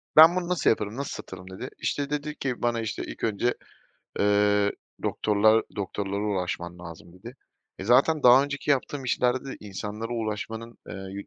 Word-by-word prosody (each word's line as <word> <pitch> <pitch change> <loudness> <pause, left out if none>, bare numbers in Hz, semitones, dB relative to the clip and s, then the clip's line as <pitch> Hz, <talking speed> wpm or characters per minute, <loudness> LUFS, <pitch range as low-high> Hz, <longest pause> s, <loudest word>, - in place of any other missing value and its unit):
"Ben, 160 +3 +9
bunu 180 -1 -1
nasıl 180 -5 +2
yaparım, 110 +1 0
nasıl 140 - -3
satırım?" 95 0 -9
dedi. 110 +7 -6
İşte, 145 -1 -2
dedi 150 +1 -3
ki 130 -3 -3
bana, 120 -1 +1
işte, 110 - -4
ilk - - -9
önce, 115 +3 +1 0.7
eee, 105 0 +3 0.3
"Doktorlar 110 +1 +3
doktorlara 100 0 -3
ulaşman 90 -3 -3
lazım." 85 0 -11
dedi. 115 +8 -11 0.4
E, 95 - -6
zaten 140 +7 +4
daha 125 +2 +8
önceki 145 0 -3
yaptığım 140 0 0
işlerde 125 +1 +1
de - - -8
insanlara 105 +3 -5
ulaşmanın, 115 +1 -4
eee, - - -6 0.2
yü 100 +1 -7
110 Hz, 165 wpm, -26 LUFS, 100-130 Hz, 0.7 s, Ben